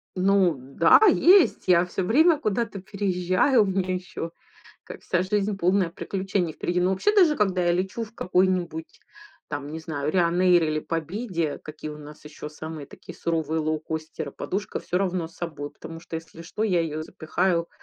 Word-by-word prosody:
Ну 185 -3 +3
да, 140 +6 +4
есть. 360 - +5
Я 180 -1 +5
всё 180 +1 -3
время 310 - +4
куда-то 215 -4 -2
переезжаю. 195 +4 +2
У - - -1
меня 185 -1 -1
ещё 180 -2 -5 0.5
как, - - -10
вся 180 0 0
жизнь, 200 +1 0
полная 185 0 +2
приключений, 190 -2 -2
впереди. 175 +3 -1
Но 180 +1 +2
вообще, 415 - +1
даже 335 -7 +5
когда 185 -4 +1
я 175 - +3
лечу 190 +6 -2
в 220 +1 -17
какой-нибудь 180 -3 -1 0.5
там, 145 -1 -5
не 160 +1 -6
знаю, 150 -2 -3
"Райнэйр" 175 0 +3
или 155 0 0
"Победе", 165 0 -3
какие 155 0 -8
у 150 - -9
нас 150 0 -12
ещё 150 0 -8
самые 155 -1 -8
такие - - -12
суровые 160 -1 -1
лоукостеры, 155 -1 -4
подушка 200 +2 -4
всё 180 - -3
равно 180 -3 -1
с 165 - -21
собой. 150 -4 -5
Потому 165 0 -10
что, 165 - -6
если 165 0 -10
что, 210 +6 -5
я 180 -5 +2
её 155 -1 -3
запихаю, 170 +2 -1
175 Hz, 170 wpm, -25 LUFS, 160-195 Hz, 0.5 s, есть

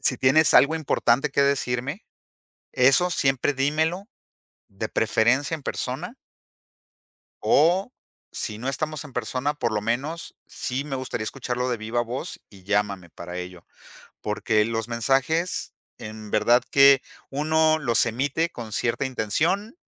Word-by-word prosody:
Si 130 -2 +1
tienes 140 +4 +5
algo 150 +4 +6
importante 140 -2 +1
que 140 - +1
decirme, 140 - -1 0.7
eso 135 +8 +4
siempre 135 -2 +1
dímelo 160 - 0 0.6
de - - -5
preferencia 130 +7 +1
en 155 - -7
persona 150 - -4 1.3
o 180 - +3 0.4
si 105 -1 -4
no 125 - -4
estamos 155 +2 -3
en 135 - -11
persona, 125 +5 -2
por 120 -6 -2
lo 105 - 0
menos, 140 +10 -3
sí 130 +3 -4
me 135 -2 -4
gustaría 125 -4 -4
escucharlo 125 0 -3
de 120 - 0
viva 110 +2 -1
voz 125 +8 -6
y 95 -3 -16
llámame 100 -4 -1
para 90 +2 -8
ello". 90 -1 -8 0.5
Porque, 105 0 +1
los 115 0 -3
mensajes 135 +9 0 0.2
en 110 -1 -9
verdad 120 +3 +4
que 140 -1 +6 0.3
uno 155 +2 +2
los 120 -6 +2
emite 140 +8 -1
con 115 -8 -8
cierta 120 +6 -1
intención 160 - -1
130 Hz, 135 wpm, -24 LUFS, 115-150 Hz, 1.3 s, algo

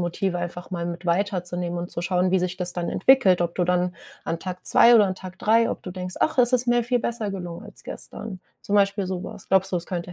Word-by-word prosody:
Motive 175 +1 -1
einfach 175 +1 -6
mal 170 -2 -3
mit 175 +1 -6
weiter 185 +1 +1
zu 175 0 -4
nehmen 175 -1 -3
und 175 +1 -5
zu 170 - -4
schauen, 180 0 +1
wie 190 - +3
sich 180 0 -2
das 180 0 -2
dann 175 -1 -3
entwickelt, 190 -6 +4
ob 170 0 -2
du 180 - +2
dann 180 0 0 0.3
an 165 - -2
Tag 180 +1 -7
2 240 - +7
oder 210 -3 +6
an 185 - -2
Tag 185 0 -10
3, 230 +2 +3
ob - - -5
du 180 - -7
denkst: 180 0 -5
„Ach, 315 - +1
es 245 0 +5
ist 250 0 +3
mir 240 -1 +3
viel 245 0 +1
besser 230 -3 -2
gelungen 175 -3 -6
als - - -12
gestern“, 200 -4 -7 0.2
zum 205 - 0
Beispiel 200 -1 +2
so 185 -1 -4
was. - - -9
Glaubst 190 0 +2
du, - - +2
es 170 - -3
könnte 175 -1 -5
185 Hz, 265 wpm, -24 LUFS, 175-200 Hz, 0.3 s, 2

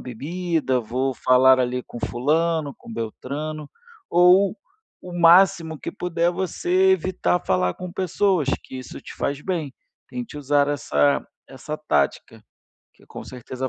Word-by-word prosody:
bebida, 150 +1 -2
vou 130 +4 -2
falar 130 +2 +5
ali 125 0 -1
com 120 - -10
fulano, 155 +2 0
com 115 - -12
beltrano", 140 +7 -5 0.4
ou 180 +3 +5 0.5
o 180 - -9
máximo 175 -2 +4
que - - -6
puder 175 -2 0
você 185 +1 +1
evitar 185 0 0
falar 90 -1 +1
com 180 -1 -8
pessoas, 185 -4 0 0.2
que 130 - -9
isso 130 - -9
te - - -11
faz 140 0 -3
bem. 165 -7 -3 0.4
Tente 245 -11 -7
usar 145 0 +2
essa 75 - +1 0.2
essa - - -7
tática, - - -1 0.5
que - - -23
com - - -9
certeza 130 +1 -6
150 Hz, 135 wpm, -23 LUFS, 130-180 Hz, 0.5 s, falar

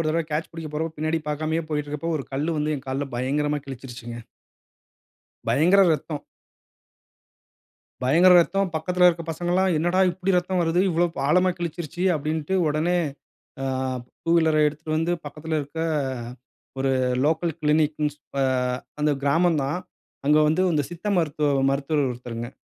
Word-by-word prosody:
ஒரு 155 - 0
தடவ 165 +1 +1
கேட்ச் 155 +2 -2
பிடிக்கப் 160 -2 -7
போறப்போ 160 +1 -2
பின்னாடி 155 +1 0
பார்க்காமயே 155 +2 -1
போய்ட்டிருக்கப்ப, 150 +2 -2
ஒரு 135 - -5
கல்லு 155 +4 -1
வந்து 150 0 0
என் 135 - -9
கால்ல 135 +1 -2
பயங்கரமாக 145 +3 -1
கிழிச்சுருச்சுங்க. 120 -3 -8 1.3
பயங்கர 170 +11 +5
இரத்தம். 155 -1 -2 1.8
பயங்கர 170 +8 +6
ரத்தம். 195 +3 +1
பக்கத்துல 180 +3 +3
இருக்க 170 -1 0
பசங்கள்ல்லாம் 175 +3 +1
"என்னடா 175 +3 +1
இப்படி 185 +2 -2
இரத்தம் 180 0 +1
வருது? 165 +2 +2
இவ்வளவு 170 0 +1
ப் - - -2
ஆழமா 180 +3 +4
கிழிச்சிசுருச்சு?" 170 +1 -4
அப்படின்டு 155 +4 -2
உடனே 165 +4 +1 0.6
அ, - - -1 0.6
2 165 - -1
வீலர 160 -2 +3
எடுத்துட்டு 155 +1 -4
வந்து 165 +2 +1
பக்கத்துல 155 +2 -4
இருக்க, 145 +3 -6 1.0
ஒரு 135 0 +1 0.3
லோக்கல் 160 +2 +1
க்ளினிக்குன்னு 150 -1 +1
சொல்ற 140 -1 -6 0.6
அந்த 150 0 +3
கிராமந்தான். 155 +1 +2 0.5
அங்க 150 +1 +5
வந்து 170 +4 +2
இந்த 150 - +2
சித்த 175 +4 -8
மருத்துவ 150 -2 0 0.2
மருத்துவர் 145 +1 0
ஒருத்தருங்க. 120 -1 -6
155 Hz, 140 wpm, -24 LUFS, 145-170 Hz, 1.8 s, பயங்கர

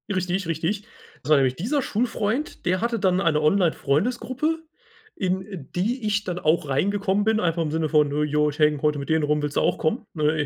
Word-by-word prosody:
Richtig, 185 0 -1
richtig. 170 +6 -2 0.4
Das 140 - -9
war 150 - +7
nämlich 130 -2 +2
dieser 260 - -1
Schulfreund, 230 +3 -2
der 185 +1 +1
hatte 235 0 0
dann 185 -1 +2
eine 160 -5 +2
Online-Freundesgruppe, 225 - 0 0.5
in 190 -5 -3
die 225 +7 -1
ich 210 0 +1
dann 180 -2 -4
auch 155 -2 +1
reingekommen 200 +7 +1
bin, 220 0 +2
einfach 170 -2 0
im 155 -2 -1
Sinne 160 0 -1
von: 150 -2 +3
„Äh, 150 +1 0
ja, 150 0 +1
ich 145 -1 -3
hänge 150 -2 +3
heute 150 -1 +1
mit 140 - -7
denen 160 -1 +2
rum, 150 0 +1
willst 145 -1 -3
du - - +3
auch - - +1
kommen?“, 220 +9 -1
ne, 155 -1 +1
175 Hz, 205 wpm, -24 LUFS, 150-205 Hz, 0.5 s, war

